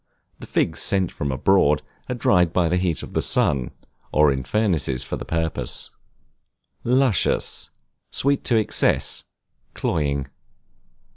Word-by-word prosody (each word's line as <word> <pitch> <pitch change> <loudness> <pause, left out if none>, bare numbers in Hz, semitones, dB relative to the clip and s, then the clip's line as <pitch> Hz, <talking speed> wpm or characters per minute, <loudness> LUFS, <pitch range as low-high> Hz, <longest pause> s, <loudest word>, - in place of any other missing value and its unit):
The - - -10
figs - - 0
sent 95 -3 +2
from 70 -1 -3
abroad 75 +1 +2 0.3
are 125 - -1
dried 90 -7 +3
by 85 -2 +1
the 90 - +1
heat 90 -3 -1
of - - -9
the - - +1
sun, 65 -4 +1 0.4
or 75 -1 +4
in 65 -1 -2
furnaces 80 - 0
for - - -4
the - - -7
purpose. 80 -1 -2 0.9
Luscious, 125 -4 +1 0.4
sweet 140 0 +1
to 120 - +3
excess, 110 - +1 0.5
cloying. 70 -4 -1
85 Hz, 130 wpm, -22 LUFS, 70-100 Hz, 0.9 s, or